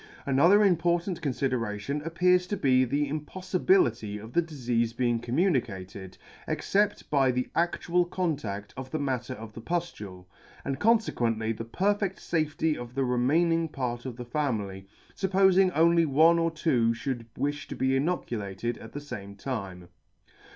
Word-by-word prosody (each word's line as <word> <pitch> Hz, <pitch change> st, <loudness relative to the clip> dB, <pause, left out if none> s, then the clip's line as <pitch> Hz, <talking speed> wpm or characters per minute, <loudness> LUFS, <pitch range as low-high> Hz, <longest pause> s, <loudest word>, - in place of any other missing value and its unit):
Another 170 Hz, +10 st, +5 dB
important 175 Hz, 0 st, +1 dB
confideration 130 Hz, -2 st, -2 dB
appears 180 Hz, +3 st, +2 dB
to 205 Hz, -, -2 dB
be 130 Hz, -4 st, +3 dB
the 145 Hz, +4 st, 0 dB
impodibility 185 Hz, -, 0 dB
of 110 Hz, +3 st, -10 dB
the 170 Hz, -, +4 dB
difeafe 120 Hz, -7 st, -2 dB
being 120 Hz, -2 st, +1 dB
communicated, 115 Hz, -, -2 dB, 0.3 s
except 205 Hz, +1 st, 0 dB
by 135 Hz, -3 st, +4 dB
the 125 Hz, 0 st, -1 dB
adhial 175 Hz, +1 st, +1 dB
contadt 135 Hz, -, -3 dB
of 130 Hz, 0 st, -7 dB
the 155 Hz, -, -2 dB
matter 130 Hz, -3 st, -2 dB
of 110 Hz, -2 st, -10 dB
the 115 Hz, -, -9 dB
pudule, 110 Hz, -, -4 dB, 0.4 s
and 135 Hz, 0 st, -2 dB
confe 225 Hz, +2 st, +3 dB
quently 115 Hz, -1 st, -1 dB
the 115 Hz, -, -6 dB
perfedt 195 Hz, -, 0 dB
fafety 155 Hz, -1 st, -1 dB
of 120 Hz, -2 st, -8 dB
the 135 Hz, -1 st, +1 dB
remaining 165 Hz, +7 st, +2 dB
part 125 Hz, -4 st, -4 dB
of 125 Hz, -, -6 dB
the 125 Hz, -, -6 dB
family, 110 Hz, -8 st, -2 dB, 0.3 s
fuppofing 190 Hz, -1 st, +4 dB
only 165 Hz, 0 st, +4 dB
one 160 Hz, +4 st, +5 dB
or 165 Hz, 0 st, +2 dB
two 135 Hz, -8 st, +1 dB
fhould 120 Hz, -1 st, -4 dB
wifla 145 Hz, 0 st, -2 dB
to -, -, -6 dB
be 130 Hz, 0 st, +1 dB
inoculated 120 Hz, -, -2 dB
at 110 Hz, -, -11 dB
the 145 Hz, -, -4 dB
fame 100 Hz, -9 st, -8 dB
time. 100 Hz, -7 st, -5 dB
135 Hz, 150 wpm, -28 LUFS, 115-170 Hz, 0.4 s, Another